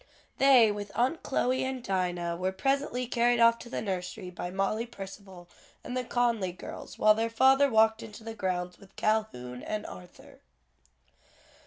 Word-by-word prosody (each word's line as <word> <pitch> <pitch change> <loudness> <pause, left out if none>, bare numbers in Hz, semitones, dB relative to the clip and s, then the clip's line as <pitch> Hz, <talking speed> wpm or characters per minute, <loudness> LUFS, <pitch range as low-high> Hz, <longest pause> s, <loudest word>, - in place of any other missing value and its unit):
They, 255 -5 +6
with 205 -1 -6
Aunt 255 +8 +1
Chloe 255 -1 0
and 260 -1 -4
Dinah, 175 -3 -1
were 185 +2 -1
presently 270 +4 -1
carried 240 0 +2
off 230 0 +5
to 235 - -10
the - - -4
nursery 180 -2 -4
by 175 0 -5
Molly 195 +5 -1
Percival 195 -4 -10 0.4
and 245 - -6
the 255 - -1
Conly 235 -6 0
girls, - - -9
while 215 0 +6
their 225 +1 -1
father 265 +4 +4
walked 220 -1 +3
into 215 0 -10
the 225 0 -6
grounds 180 -3 -3
with 195 -1 -18
Calhoun 125 - -1
and 215 0 -4
Arthur. 90 -1 -12
215 Hz, 160 wpm, -29 LUFS, 185-240 Hz, 0.4 s, They